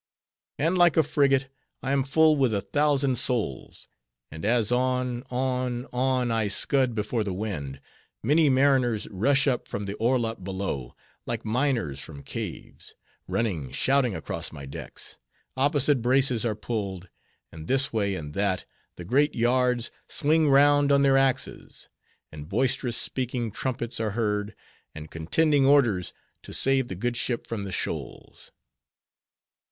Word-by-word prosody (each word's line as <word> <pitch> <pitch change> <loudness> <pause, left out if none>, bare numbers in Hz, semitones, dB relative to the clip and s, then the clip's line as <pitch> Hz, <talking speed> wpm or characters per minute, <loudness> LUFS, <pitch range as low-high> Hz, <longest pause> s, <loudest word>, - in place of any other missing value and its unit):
And 165 +5 +1
like 175 -3 +5
a 160 - +6
frigate, 135 -3 +2 0.3
I 135 - -1
am 140 -1 +2
full 155 +3 +4
with 130 -6 +2
a 100 - 0
thousand 140 +3 +1
souls; 120 - -3 0.4
and 80 +1 -9
as 115 0 +2
on, 125 -1 0
on, 125 -1 -1
on, 125 -1 +1
I 110 -2 +1
scud 130 +4 +1
before 110 +1 -1
the 100 -3 -3
wind, 75 -10 -4 0.4
many 150 +5 +4
mariners 130 -4 +2
rush 135 +8 +2
up 125 -3 0
from 100 - -4
the 100 - -4
orlop 115 -4 0
below, 95 -10 -4 0.3
like - - -3
miners 115 - 0
from 70 0 -9
caves; - - -7 0.3
running 90 - -2
shouting 135 -6 +1
across - - -5
my 70 -3 -9
decks; 70 - -8 0.4
opposite 140 0 +2
braces 125 -1 +2
are 110 - -1
pulled; 100 -4 -4 0.4
and 80 0 -10
this 135 0 +2
way 100 -3 0
and 75 -4 -7
that, 100 -1 0 0.3
the 85 - -9
great 140 - +2
yards 125 0 +1 0.2
swing 155 0 +2
round 145 +1 +5
on 140 0 +4
their 135 -1 +4
axes; 135 -1 -1 0.4
and 75 +1 -9
boisterous 120 +2 +1
speaking 125 -3 -2
trumpets 120 +1 -4
are 110 -1 -2
heard; 105 -2 -1 0.4
and 80 0 -9
contending 140 - +2
orders, 120 - +3 0.3
to - - -10
save 135 -1 +1
the 95 - -5
good 120 +6 -2
ship 120 0 -2
from 115 -3 -4
the 100 -1 -5
shoals. - - -6
120 Hz, 145 wpm, -26 LUFS, 100-135 Hz, 0.4 s, a